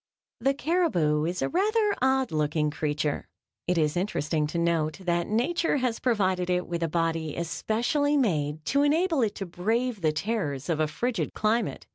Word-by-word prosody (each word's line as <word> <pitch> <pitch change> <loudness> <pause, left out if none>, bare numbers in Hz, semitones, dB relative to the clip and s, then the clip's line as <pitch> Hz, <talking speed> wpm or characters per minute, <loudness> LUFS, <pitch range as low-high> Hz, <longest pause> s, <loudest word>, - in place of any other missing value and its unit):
The 270 +4 +1
caribou 225 - +1
is 175 +2 -2
a - - 0
rather 420 +3 +2
odd 265 0 +2
looking 150 0 0
creature. 150 -1 -2 0.4
It 180 0 +1
is 150 -1 +1
interesting 155 -5 0
to 160 - -4
note 165 -2 +1
that 175 -1 0
Nature 290 +9 +1
has 250 -4 -1
provided 185 -7 +1
it 180 0 +1
with 170 0 -4
a 165 - +1
body 165 -1 -1
especially 240 - 0
made 155 - 0
to 280 - +2
enable 315 +1 +2
it 220 -3 0
to 195 - -4
brave 220 +6 -1
the 155 -2 +3
terrors 155 - -2
of 160 -2 0
a 155 - +2
frigid 190 +1 -2
climate. 220 +2 0
180 Hz, 170 wpm, -27 LUFS, 155-255 Hz, 0.4 s, the